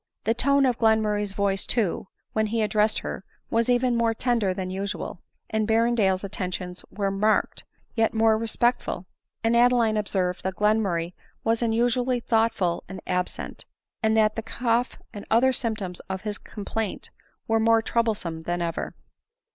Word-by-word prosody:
The 225 Hz, -, +2 dB
tone 280 Hz, +3 st, +3 dB
of 250 Hz, -3 st, +1 dB
Glenmurray's 210 Hz, -3 st, +2 dB
voice 195 Hz, -1 st, 0 dB
too, 210 Hz, -6 st, 0 dB, 0.3 s
when 220 Hz, 0 st, +1 dB
he 225 Hz, +1 st, 0 dB
addressed 215 Hz, 0 st, +2 dB
her, -, -, -5 dB, 0.3 s
was 230 Hz, +1 st, +2 dB
even 245 Hz, 0 st, +3 dB
more 230 Hz, -1 st, +2 dB
tender 230 Hz, -5 st, +1 dB
than 185 Hz, 0 st, -4 dB
usual, 190 Hz, -2 st, -4 dB, 0.3 s
and 220 Hz, -1 st, 0 dB
Berrendale's 220 Hz, -4 st, +2 dB
attentions 180 Hz, -2 st, -4 dB
more 200 Hz, -1 st, -1 dB
marked, 210 Hz, +2 st, +1 dB, 0.3 s
yet 225 Hz, -1 st, +2 dB
more 225 Hz, 0 st, +4 dB
respectful; 230 Hz, -4 st, 0 dB, 0.4 s
and 225 Hz, +1 st, +3 dB
Ade 240 Hz, +1 st, +6 dB
line 230 Hz, -3 st, +2 dB
observed 190 Hz, -3 st, -1 dB
that 190 Hz, 0 st, -3 dB
Glenmurray 195 Hz, -5 st, +1 dB, 0.3 s
was 225 Hz, +1 st, +1 dB
unusually 245 Hz, +2 st, +1 dB
thoughtful 220 Hz, -7 st, +1 dB
and 190 Hz, -, -6 dB
absent, 180 Hz, 0 st, -3 dB, 0.4 s
and 220 Hz, -1 st, +2 dB
that 215 Hz, -1 st, +3 dB
the 225 Hz, -, -2 dB
cough 235 Hz, +2 st, -1 dB, 0.2 s
and 205 Hz, -2 st, -9 dB
xtfher 255 Hz, +4 st, +4 dB
symptoms 215 Hz, -7 st, -2 dB
of 190 Hz, -1 st, -3 dB
his 210 Hz, -1 st, -3 dB
complaint 210 Hz, 0 st, -5 dB, 0.4 s
were 225 Hz, 0 st, +2 dB
more 225 Hz, 0 st, +4 dB
troublesome 210 Hz, -9 st, -1 dB
than 175 Hz, +2 st, -2 dB
ever. 170 Hz, -1 st, -3 dB
220 Hz, 155 wpm, -25 LUFS, 195-230 Hz, 0.4 s, Ade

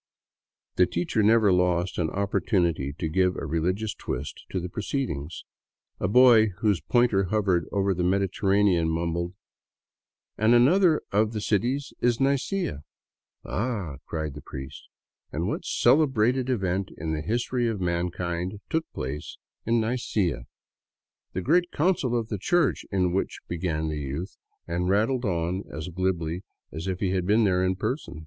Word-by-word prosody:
The 90 Hz, -, +5 dB
teacher 90 Hz, +5 st, 0 dB
never 105 Hz, -2 st, +5 dB
lost 90 Hz, 0 st, +1 dB
an 80 Hz, -2 st, +1 dB
opportunity 90 Hz, -, 0 dB
to 80 Hz, -, -2 dB
give 90 Hz, +3 st, +2 dB
a -, -, -4 dB
religious 90 Hz, +7 st, -1 dB
twist -, -, -6 dB
to 95 Hz, -, -2 dB
the 90 Hz, -, -4 dB
proceedings. 90 Hz, -, -4 dB, 0.6 s
A -, -, 0 dB
boy 115 Hz, 0 st, +7 dB
whose 105 Hz, -, +2 dB
pointer 110 Hz, +2 st, +2 dB
hovered 95 Hz, -3 st, +1 dB
over 100 Hz, -1 st, +1 dB
the 90 Hz, 0 st, -2 dB
Mediterranean 95 Hz, -1 st, +2 dB
mumbled: 85 Hz, +2 st, -2 dB, 0.5 s
" -, -, -64 dB
And 110 Hz, +3 st, +5 dB
another 160 Hz, +7 st, +4 dB
of 105 Hz, +2 st, +2 dB
the 110 Hz, -, -2 dB
cities 120 Hz, +7 st, 0 dB
is 120 Hz, -1 st, +2 dB
Nicea... 140 Hz, -, 0 dB, 0.2 s
." -, -, -68 dB
" -, -, -60 dB
Ah,'^ 100 Hz, -, -3 dB
cried 80 Hz, -3 st, -3 dB
the 75 Hz, -, -9 dB
priest, 65 Hz, 0 st, -9 dB, 0.2 s
" -, -, -51 dB
And -, -, -2 dB
what -, -, -3 dB
celebrated 130 Hz, -3 st, +3 dB
event 95 Hz, -5 st, 0 dB
in 80 Hz, +1 st, -3 dB
the 75 Hz, -, -2 dB
history 120 Hz, +5 st, -1 dB
of 110 Hz, -3 st, -2 dB
mankind 90 Hz, +2 st, -2 dB
took 160 Hz, 0 st, -1 dB
place 70 Hz, +4 st, -5 dB, 0.3 s
in 115 Hz, 0 st, +3 dB
Nicea?" 110 Hz, -, -1 dB, 0.4 s
" -, -, -59 dB
The 95 Hz, -, -2 dB
great 175 Hz, -, +2 dB
Council 145 Hz, -7 st, +1 dB
of 115 Hz, -1 st, -3 dB
the 105 Hz, -, -3 dB
Church 170 Hz, -, +1 dB
in 90 Hz, -3 st, +1 dB
which.. 95 Hz, -, -1 dB
." -, -, -51 dB
began 80 Hz, -2 st, -2 dB
the 75 Hz, -1 st, -3 dB
youth, 70 Hz, +6 st, -5 dB, 0.3 s
and 90 Hz, +1 st, -1 dB
rattled 115 Hz, +6 st, +1 dB
on 90 Hz, 0 st, -1 dB
as 75 Hz, +3 st, -5 dB
glibly 90 Hz, -1 st, -2 dB, 0.3 s
as 80 Hz, +4 st, -6 dB
if 95 Hz, -1 st, -3 dB
he 95 Hz, -3 st, +1 dB
had 90 Hz, -1 st, -1 dB
been 110 Hz, +3 st, +4 dB
there 90 Hz, -3 st, +2 dB
in 95 Hz, 0 st, +1 dB
person. 115 Hz, -, -4 dB
95 Hz, 165 wpm, -26 LUFS, 85-115 Hz, 0.6 s, boy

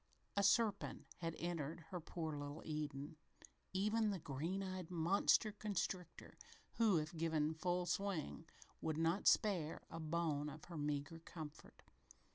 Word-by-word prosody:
A 200 Hz, -, +4 dB
serpent 205 Hz, +1 st, +3 dB
had 165 Hz, -1 st, -2 dB
entered 165 Hz, -1 st, -2 dB
her 180 Hz, -, -2 dB
poor 160 Hz, -1 st, -3 dB
little 145 Hz, +1 st, -5 dB
Eden 150 Hz, -1 st, -3 dB, 0.5 s
even 215 Hz, +3 st, +2 dB
the 200 Hz, -, 0 dB
green 165 Hz, +6 st, -2 dB
eyed 185 Hz, -3 st, -4 dB
monster 185 Hz, +5 st, +4 dB
constrictor, 195 Hz, -4 st, -3 dB, 0.4 s
who, 220 Hz, -6 st, +5 dB
if 155 Hz, +3 st, -2 dB
given 160 Hz, -1 st, +2 dB
full 175 Hz, +2 st, 0 dB
swing, 175 Hz, -3 st, -1 dB, 0.3 s
would 160 Hz, -1 st, 0 dB
not 165 Hz, +4 st, +2 dB
spare 175 Hz, -7 st, +3 dB
a -, -, -4 dB
bone 155 Hz, -2 st, 0 dB
of 150 Hz, +1 st, -9 dB
her 170 Hz, -2 st, -7 dB
meager 145 Hz, +2 st, -1 dB
comfort. 155 Hz, -2 st, -9 dB
165 Hz, 135 wpm, -41 LUFS, 155-190 Hz, 0.5 s, who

